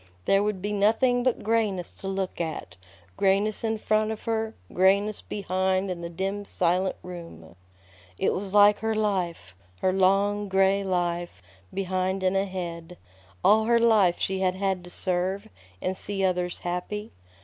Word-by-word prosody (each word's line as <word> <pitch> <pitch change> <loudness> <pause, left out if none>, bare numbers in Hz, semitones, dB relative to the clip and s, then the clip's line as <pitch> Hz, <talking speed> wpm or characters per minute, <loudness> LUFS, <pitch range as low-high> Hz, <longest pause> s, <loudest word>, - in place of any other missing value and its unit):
There 195 0 +4
Would 205 -3 -2
be 205 - -1
nothing 225 +5 +3
but 255 -1 0
grayness 210 -5 0
to 195 - -6
look 190 -2 -3
at, 155 - -5 0.4
grayness 200 +3 +2
in 225 -1 0
front 215 0 +1
of 220 -1 -5
her, 225 -1 -2 0.2
grayness 200 +3 +3
behind 190 -1 -1
in 175 -1 -5
the 170 - -5
dim, 195 +4 -3
silent 185 0 0
room. 165 - -10 0.6
It - - +1
was 195 0 -4
like 205 0 +6
her 220 0 -1
life, 180 - -1 0.3
her 185 - +2
long, 200 +2 +2
gray 195 +1 +3
life, 175 - -2 0.3
behind 190 0 -1
and 185 +1 +2
ahead. 180 -3 -3 0.5
All 220 +2 +5
her 235 +1 +4
life 215 -7 +4
she 190 0 -1
had 185 -1 +1
had 190 -2 -1
to - - -10
serve, 185 +2 -1 0.4
and 185 - -1
see 195 0 -3
others 180 -1 0
happy. 180 +5 -4
190 Hz, 155 wpm, -26 LUFS, 180-205 Hz, 0.6 s, like